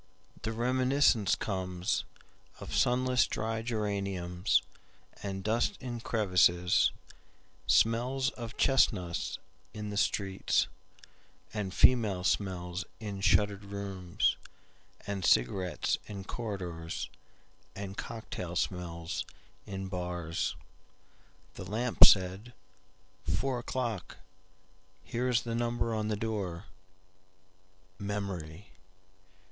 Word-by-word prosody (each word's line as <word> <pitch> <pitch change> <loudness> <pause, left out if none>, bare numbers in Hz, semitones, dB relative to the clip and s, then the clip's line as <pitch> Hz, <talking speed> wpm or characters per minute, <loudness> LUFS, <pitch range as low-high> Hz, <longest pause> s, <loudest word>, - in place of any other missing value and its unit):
The 110 - -2
reminiscence 125 -3 +3
comesOf 90 -3 -4
sunless 125 0 +3
dry 110 0 -2
geraniumsAnd 100 -2 -2
dust 115 - +1
in 120 -2 -5
crevices, 90 -6 +3 0.8
Smells 125 +5 +3
of 115 -2 -8
chestnuts 90 -8 +2 0.4
in 105 -1 -4
the 100 - -4
streets, 95 -2 +1 0.9
And 105 -3 -2
female 105 -4 +4
smells 90 -2 -1 0.2
in 100 -3 -5
shuttered 100 0 +3
rooms, 100 -3 -1 0.7
And 100 -2 -3
cigarettes 90 +7 +2
in 100 -2 -6
corridorsAnd 95 -1 -7
cocktail 95 -6 -5
smells 85 -3 -2 0.4
in 95 -1 -4
bars."The 90 -3 -3 1.2
lamp 115 +5 +6
said,"Four 95 - -1
o'clock, 120 -5 -3 0.9
Here 125 +2 -1
is 120 -2 +2
the 115 - -3
number 120 0 0
on 110 -1 -1
the 110 - 0
door. 100 -5 -3 1.3
Memory! 100 -4 -4
100 Hz, 80 wpm, -31 LUFS, 90-115 Hz, 1.3 s, lamp